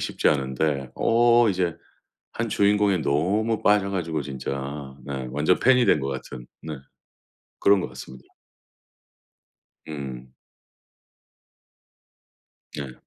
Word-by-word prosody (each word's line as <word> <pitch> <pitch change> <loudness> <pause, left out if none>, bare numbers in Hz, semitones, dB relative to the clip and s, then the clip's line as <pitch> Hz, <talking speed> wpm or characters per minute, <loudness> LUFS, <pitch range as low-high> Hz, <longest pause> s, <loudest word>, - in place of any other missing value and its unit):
쉽지 - - 0
않은데 70 -1 0
어 120 0 +4
이제 90 -3 0 0.6
1 115 0 -2
주인공에 100 -2 +3
너무 100 +11 0
빠져 105 -1 +3
가지고 80 -5 -2
진짜. 70 0 -5
네. 65 -2 -4
완전 75 +6 +2
팬이 125 -1 +5
된 75 - +4
것 70 - -3
같은 65 -2 -7 0.2
네. 80 -1 -5 0.9
그런 100 -1 +5
것 - - -4
같습니다. 65 0 -11 1.6
음. 65 -4 -7 2.4
예. 70 -3 -5
75 Hz, 185 characters per minute, -24 LUFS, 70-100 Hz, 2.4 s, 팬이